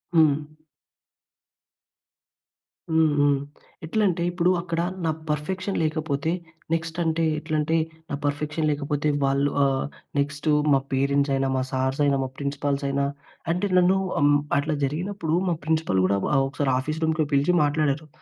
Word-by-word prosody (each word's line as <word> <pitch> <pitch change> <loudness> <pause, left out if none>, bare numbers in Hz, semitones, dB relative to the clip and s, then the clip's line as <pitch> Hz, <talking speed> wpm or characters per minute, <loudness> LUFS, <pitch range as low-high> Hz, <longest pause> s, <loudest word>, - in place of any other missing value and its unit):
హ్మ్. 155 -3 +5 2.5
హ్మ్. 160 -1 +4
హ్మ్. 145 0 +4 0.5
ఎట్లంటే 180 -1 +1
ఇప్పుడు 175 0 +1
అక్కడ 170 -1 -3 0.3
నా 160 - +2 0.2
పర్‌ఫెక్షన్ 185 +6 -2
లేకపోతే 155 -1 -1 0.4
నెక్స్ట్ 165 0 -2
అంటే, 165 0 0 0.2
ఎట్లంటే 155 0 -1 0.3
నా - - -2
పర్‌ఫెక్షన్ 150 +2 -1
లేకపోతే 145 0 -1 0.2
వాళ్ళు 140 +1 +2
ఆహ్, 135 -1 +1 0.3
నెక్స్ట్ 145 +2 -2 0.3
మా 135 - +5
పేరెంట్స్ 140 +1 +2
అయినా, 135 0 +1
మా 130 - +1
సార్స్ 130 +2 0
అయినా, 140 -1 +3
మా 130 - -4
ప్రిన్సిపల్స్ 140 0 -2
అయినా, 140 0 0 0.5
అంటే 180 +4 0
నన్ను 180 +1 +4 0.2
అం 145 - +4 0.3
అట్లా 150 +2 0
జరిగినప్పుడు 165 +3 -1
మా - - +2
ప్రిన్సిపల్స్ 160 -13 +1
కూడా 100 +1 +2 0.3
ఒకసారి 135 0 -1
ఆఫీస్ 155 +4 -3
రూమ్‌కి 160 -1 +1
పిలిచి 145 +6 +3
మాట్లాడారు. 145 0 0
150 Hz, 130 wpm, -25 LUFS, 140-160 Hz, 2.5 s, హ్మ్